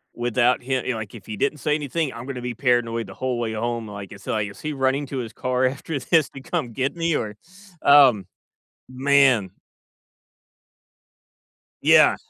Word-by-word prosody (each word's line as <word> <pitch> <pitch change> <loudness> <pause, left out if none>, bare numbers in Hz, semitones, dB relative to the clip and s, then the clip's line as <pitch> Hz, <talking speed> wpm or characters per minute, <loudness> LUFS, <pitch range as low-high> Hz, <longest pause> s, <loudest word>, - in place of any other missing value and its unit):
without 120 +1 +1
him 130 -1 -1
you - - 0
know, 115 - -4
like 110 -1 -7
if 110 -3 -12
he 110 - -6
didn't 150 - 0
say 150 +3 +1
anything, 150 0 -2
I'm 115 +1 -8
gonna 130 -2 -5
be 120 -1 -4
paranoid 120 -2 +1
the - - -10
whole 130 -1 -2
way 115 -2 -2
home, 115 0 -3
like 100 -2 -8
it's 100 -1 -12
like, 105 -1 -1
is 100 - -13
he 155 0 -3
running 135 +1 0
to 135 - -5
his 115 -3 -5
car 130 0 0
after 140 +3 -2
this 155 +4 +2
to 135 - -10
come 135 -7 -3
get 130 +6 -1
me, 165 -1 0
or, 105 -5 -3 0.5
um, 135 -8 +6 0.6
man. 130 -6 +3 2.3
Yeah. - - +6
125 Hz, 180 wpm, -23 LUFS, 115-140 Hz, 2.3 s, um